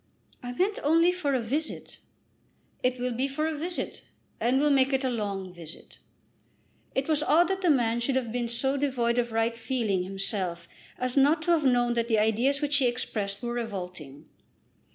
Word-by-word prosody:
"I 245 - -5
meant 385 +10 0
only 330 +4 +4
for 295 -7 -1
a - - +2
visit." 280 +8 -4 0.8
"It 250 0 0
will 250 0 -1
be 255 +4 0
for 275 +3 -2
a 320 - -1
visit, 340 +4 -5 0.4
and 245 +3 +2
we'll 295 +2 +3
make 270 0 +3
it 265 0 +1
a 260 - 0
long 200 -5 -3
visit." 170 -2 -12 1.0
It 265 0 0
was 310 -2 +1
odd 330 +3 +4
that 385 0 -1
the 360 - +2
man 240 -5 +2
should 255 +3 -1
have 245 -4 -1
been 240 0 -2
so 265 +4 -1
devoid 245 -4 0
of 240 -1 -1
right 225 +1 0
feeling 225 -5 -1
himself 185 -2 -1 0.3
as 255 0 -2
not 290 +4 +4
to 345 - +1
have 320 -4 +3
known 245 -2 +3
that 235 -1 0
the 225 -2 +2
ideas 235 +7 +2
which 290 -1 +1
he 265 -3 +3
expressed 215 -4 -2
were 240 0 -2
revolting! 180 - -6
245 Hz, 190 wpm, -27 LUFS, 225-280 Hz, 1.0 s, only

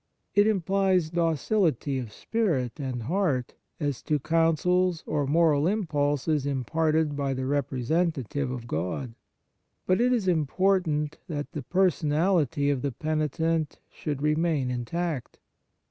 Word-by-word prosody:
It 205 +1 +5
implies 190 -4 +2
docility 165 - +1
of 120 -4 -6
spirit 165 - -1
and 130 -4 -3
heart 145 - 0 0.3
as 145 -5 -2
to 150 - 0
counsels 165 +3 +2
or 145 -2 -1
moral 155 0 +3
impulses 150 -6 0
im 135 -2 -1
parted 155 +1 +1
by 140 -2 -1
the 130 0 -3
representative 140 0 -1
of 125 -2 -5
God. 90 - -3 0.7
But 185 +4 +2
it 250 +1 +3
is 230 -6 +1
important 160 -2 +1
that 150 -4 -4
the 150 - -5
per 185 +7 +3
sonality 150 -2 +1
of 130 - -4
the 140 - -1
penitent 155 +2 -1
should 145 -2 -4
re 150 0 +3
main 155 -5 0
intact. 140 +4 -3
155 Hz, 130 wpm, -27 LUFS, 140-175 Hz, 0.7 s, It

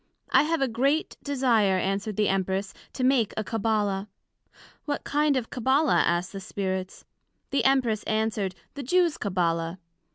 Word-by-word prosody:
I - - +6
have 320 0 0
a - - +2
great 275 +7 0
desire, 240 -9 +2
answered 195 +3 -2
the 210 0 +2
Empress, 190 +1 -1 0.2
to 255 - -3
make 255 -5 +2
a 215 - 0
Cabbala. 210 -3 -1 0.8
What 290 -1 -2
kind 295 -1 +2
of 240 -3 -4
Cabbala 265 +4 +2
asked 175 +1 0
the 195 - -5
Spirits? 190 -1 -4 0.5
The 275 - +1
Empress 250 -6 +2
answered, 215 -3 -1 0.2
The 285 - -6
Jews 345 +4 +2
Cabbala. 170 -3 -1
220 Hz, 150 wpm, -26 LUFS, 195-270 Hz, 0.8 s, I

